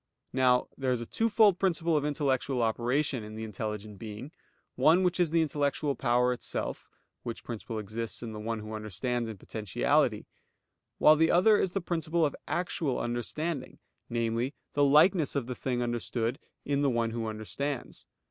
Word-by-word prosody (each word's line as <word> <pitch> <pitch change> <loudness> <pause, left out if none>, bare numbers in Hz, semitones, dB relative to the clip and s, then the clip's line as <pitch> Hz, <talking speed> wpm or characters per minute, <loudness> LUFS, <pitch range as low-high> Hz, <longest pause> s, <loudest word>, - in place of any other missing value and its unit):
Now 125 -1 +3
there 130 -1 -1
is 125 - +1
a 120 - -5
twofold 215 - +3
principle 170 -3 +1
of 150 - +2
intellectual 135 -4 0
operation 120 +3 0
in 105 0 -8
the 110 - -5
intelligent 105 -1 -5
being; 110 +6 -7 0.4
one 175 +4 +4
which 180 0 +1
is 175 -3 +3
the 165 +1 +3
intellectual 145 -1 0
power 125 0 +2
itself, 125 - -4 0.3
which 115 - -6
principle 115 -1 -5
exists 110 +3 -4
in 115 - -5
the 105 - -6
one 110 0 -3
who 110 +1 -7
understands 115 +3 -2
in 110 - -7
potentiality; 105 0 0 0.7
while 155 - +7
the 160 +1 +3
other 190 +5 +5
is 190 -3 +1
the 195 - -1
principle 165 -1 0
of 145 - -1
actual 170 -6 -1
understanding, 130 +6 -3 0.3
namely, 115 +3 -1 0.2
the 145 - +3
likeness 150 +3 +5
of 140 -4 0
the 125 - -4
thing 125 -1 -2
understood 120 +1 -2 0.3
in 140 0 +1
the 140 - +3
one 115 -2 0
who 115 -1 -3
understands. 120 +6 -4
125 Hz, 165 wpm, -29 LUFS, 115-155 Hz, 0.7 s, while